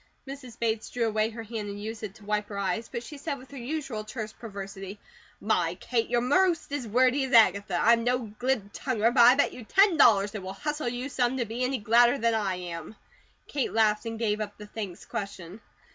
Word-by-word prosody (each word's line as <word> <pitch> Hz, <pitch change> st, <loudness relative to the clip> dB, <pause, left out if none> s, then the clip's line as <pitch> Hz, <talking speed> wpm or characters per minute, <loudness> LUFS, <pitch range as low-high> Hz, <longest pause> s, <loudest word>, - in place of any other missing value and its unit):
Mrs. 270 Hz, -3 st, -9 dB
Bates 225 Hz, -1 st, -1 dB
drew 240 Hz, -1 st, -1 dB
away 215 Hz, 0 st, +1 dB
her 230 Hz, 0 st, -7 dB
hand 215 Hz, -2 st, -5 dB
and 200 Hz, 0 st, -6 dB
used 220 Hz, +1 st, -6 dB
it 210 Hz, -2 st, -6 dB
to 210 Hz, -, -16 dB
wipe 210 Hz, 0 st, -1 dB
her 200 Hz, -, -6 dB
eyes; 200 Hz, +3 st, -2 dB
but 235 Hz, -, -4 dB
she 290 Hz, +4 st, -10 dB
said 285 Hz, -1 st, -3 dB
with 260 Hz, +1 st, -15 dB
her 280 Hz, -, -9 dB
usual 260 Hz, -4 st, -4 dB
terse 215 Hz, 0 st, -6 dB
perversity: 195 Hz, -2 st, -8 dB, 0.4 s
"My, 180 Hz, -5 st, +1 dB
Kate! 230 Hz, +4 st, -1 dB
You're 240 Hz, 0 st, +2 dB
most 335 Hz, +5 st, +2 dB
as 285 Hz, -5 st, -3 dB
wordy 255 Hz, +5 st, +3 dB
as 265 Hz, -, -6 dB
Agatha. 200 Hz, -3 st, +5 dB
I'm 230 Hz, 0 st, +4 dB
no 245 Hz, -3 st, -1 dB
glibtonguer, 240 Hz, -1 st, 0 dB
but 245 Hz, -, +5 dB
I 245 Hz, +2 st, +8 dB
bet 285 Hz, -, +2 dB
you 250 Hz, -, -9 dB
ten 390 Hz, -, +4 dB
dollars 205 Hz, -7 st, +5 dB
it 210 Hz, -, -5 dB
will 190 Hz, +1 st, -6 dB
hustle 295 Hz, +3 st, -3 dB
you 245 Hz, +2 st, -4 dB
some 255 Hz, -2 st, 0 dB
to 240 Hz, -, 0 dB
be 230 Hz, +3 st, -3 dB
any 260 Hz, +1 st, 0 dB
gladder 240 Hz, +4 st, +4 dB
than 230 Hz, -1 st, +1 dB
I 205 Hz, -4 st, 0 dB
am." 175 Hz, +1 st, -7 dB, 0.5 s
Kate 280 Hz, -3 st, -2 dB
laughed 215 Hz, 0 st, +2 dB
and 225 Hz, 0 st, -4 dB
gave 215 Hz, -2 st, 0 dB
up 205 Hz, -1 st, -5 dB
the 210 Hz, -, -9 dB
thanks 205 Hz, -4 st, -7 dB
question. 200 Hz, -3 st, -6 dB
225 Hz, 220 wpm, -27 LUFS, 210-250 Hz, 0.5 s, I